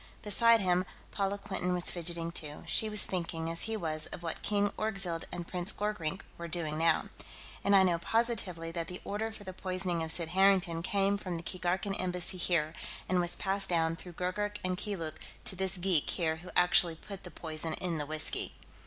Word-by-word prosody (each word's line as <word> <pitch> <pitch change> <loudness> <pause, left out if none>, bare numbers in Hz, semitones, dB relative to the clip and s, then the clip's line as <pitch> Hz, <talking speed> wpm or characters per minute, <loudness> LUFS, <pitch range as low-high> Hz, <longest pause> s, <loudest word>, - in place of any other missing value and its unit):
Beside 230 +2 +5
him, 180 -1 +2 0.3
Paula 200 0 -1
Quinton 180 -2 -2
was 175 - +2
fidgeting, 170 -1 0
too; 150 -3 -5
she 220 - +3
was 210 -1 +3
thinking, 165 -2 -3
as 165 - +3
he 220 - -1
was, 155 -4 -1
of 175 - -8
what 165 - -3
King 205 -1 +1
Orgzild 195 -6 -1
and 175 -1 -5
Prince 180 +2 0
Gorkrink 195 -4 -3 0.2
were 170 - -5
doing 155 -2 -1
now. 165 -1 +2 0.5
"And 200 - +4
I 190 - +7
know 175 -2 +2
positively 190 -6 -1
that 165 -1 -4
the 180 +1 -7
order 220 +2 -3
for 220 -2 -10
the 185 -1 -7
poisoning 185 -2 -1
of 160 0 -2
Sid 165 -1 +2
Harrington 185 -2 +3
came 200 +2 +1
from 185 -3 -4
the 165 - -5
Keegarkan 185 +3 -1
Embassy 180 0 0
here, 165 -3 +1 0.3
and 185 0 +2
was 175 0 +5
passed 195 0 +2
down 165 -2 +1
through 175 +1 -10
Gurgurk 205 +4 -2
and 185 0 0
Keeluk 180 -5 -4 0.3
to - - 0
this 190 0 +5
geek 175 -4 +1
here 160 -2 0
who 175 +3 -10
actually 180 -1 +4
put 195 +3 -9
the - - -8
poison 160 0 -3
in 170 -3 -2
the 145 - -3
whiskey." 155 0 +1
180 Hz, 195 wpm, -31 LUFS, 165-195 Hz, 0.5 s, I